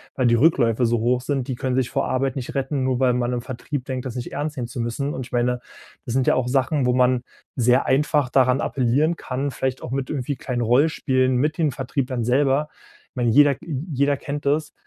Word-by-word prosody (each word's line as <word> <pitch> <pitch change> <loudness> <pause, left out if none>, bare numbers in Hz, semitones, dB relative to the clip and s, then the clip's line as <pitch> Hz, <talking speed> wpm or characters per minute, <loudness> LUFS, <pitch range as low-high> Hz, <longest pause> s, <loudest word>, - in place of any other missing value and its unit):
weil 130 -2 +2
die 120 - +4
Rückläufe 120 -4 +3
so 115 0 +1
hoch 125 +2 +1
sind, 135 -1 -2
die 130 - -2
können 130 0 -2
sich 130 -2 0
vor - - -1
Arbeit 135 +2 -1
nicht 130 -3 -5
retten, 135 0 -1
nur 130 -1 0
weil 130 -2 +3
man 125 0 -1
im 120 - -2
Vertrieb 130 +2 -5
denkt, 130 -1 -4
das 125 - -5
nicht 125 -1 -5
ernst 150 -1 -3
nehmen 120 -2 -3
zu 125 0 -7
müssen. 140 +5 -2
Und 130 - -5
ich 130 - -16
meine, 125 0 0 0.5
das 120 - -4
sind 130 0 +1
ja - - +4
auch 125 -1 0
Sachen, 135 +1 +1
wo 125 - +2
man 125 0 +2 0.3
sehr 125 +2 +3
einfach 145 -1 +2
daran 130 0 +3
appellieren 140 +6 +1
kann, 135 -1 -3
vielleicht 130 -1 -3
auch - - -6
mit 135 +1 -2
irgendwie 140 -1 -2
kleinen 125 -1 -3
Rollenspielen 130 0 +2
mit 150 +4 0
den 155 -4 +1
Vertrieblern 130 -2 -3
selber. 135 +4 +2 0.4
Ich - - -68
meine, 120 -2 +1
jeder 145 +3 +6
j - - -14 0.3
jeder 140 +1 +1
kennt 145 0 -6
das. 150 +2 0
130 Hz, 230 wpm, -22 LUFS, 125-140 Hz, 0.5 s, jeder